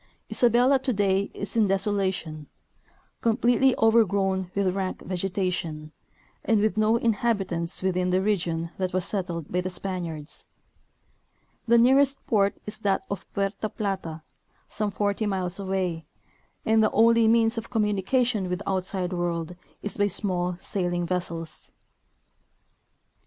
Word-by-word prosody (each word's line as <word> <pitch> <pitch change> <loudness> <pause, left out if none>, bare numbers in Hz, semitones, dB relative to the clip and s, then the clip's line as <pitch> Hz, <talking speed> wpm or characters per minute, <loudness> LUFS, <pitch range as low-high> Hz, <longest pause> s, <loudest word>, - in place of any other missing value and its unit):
Isabelki 250 +3 +4
today 200 -6 +1
is 200 +1 -6
in 220 -3 +4
desolation, 190 -6 -1 0.7
completely 245 +3 +3
over 225 +1 +5
grown 190 -2 -1
with 195 -2 +1
rank 190 -1 -3
vegetation, 180 -5 -3 0.5
and 225 -2 +2
with 215 +1 +1
no 215 +1 +3
inhabitants 200 -7 -1
within 185 -1 +1
the 185 +1 +2
region 170 -5 -1
that 185 -1 -1
was 185 -1 +2
settled 175 -6 -2
by 180 - +1
the 185 - -3
Spaniards. 175 -5 -3 1.2
The 235 +1 +5
nearest 270 +3 +5
port 200 -2 +1
is 210 0 -6
that 200 -3 0
of 200 -2 -6
Puerta 200 +2 -1
Plata, 190 -7 -4 0.4
some 210 0 -2
forty 205 +2 -1
iniles 185 -2 -1
away, 185 -4 -2 0.6
and 220 0 +4
the 215 - +4
only 230 +1 +4
means 225 0 +3
of 225 - -10
communication 210 0 +1
with 180 - -1
the 200 - -6
outside 185 -1 -2
world 175 -1 -2 0.3
is 205 - -3
by 205 0 +3
small 180 -3 0
sailing 175 -2 -2
vessels. 170 -2 -4
195 Hz, 130 wpm, -26 LUFS, 180-215 Hz, 1.2 s, over